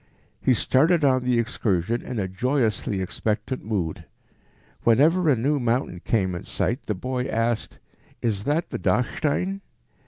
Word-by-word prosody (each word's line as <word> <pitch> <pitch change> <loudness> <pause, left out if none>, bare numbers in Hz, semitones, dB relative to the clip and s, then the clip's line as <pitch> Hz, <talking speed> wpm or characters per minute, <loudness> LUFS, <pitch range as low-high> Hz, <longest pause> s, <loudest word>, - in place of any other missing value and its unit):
He 130 - +3
started 155 +7 +3
on 130 -2 +3
the 125 -1 +2
excursion 115 -2 0
in 125 - -6
a 100 -3 -1
joyously 110 -2 0
expectant 110 +6 -2
mood. 95 -7 -3 0.8
Whenever 155 +9 +4
a 140 - +5
new 140 +5 +1
mountain 120 -6 0
came 95 -2 0
in 85 - -4
sight 125 +5 -2
the 105 - -1
boy 125 +6 -3
asked, 115 -1 -1 0.4
"Is 105 -3 -1
that 155 +4 0
the - - -3
Dachstein?" 180 +9 0
120 Hz, 145 wpm, -24 LUFS, 105-135 Hz, 0.8 s, a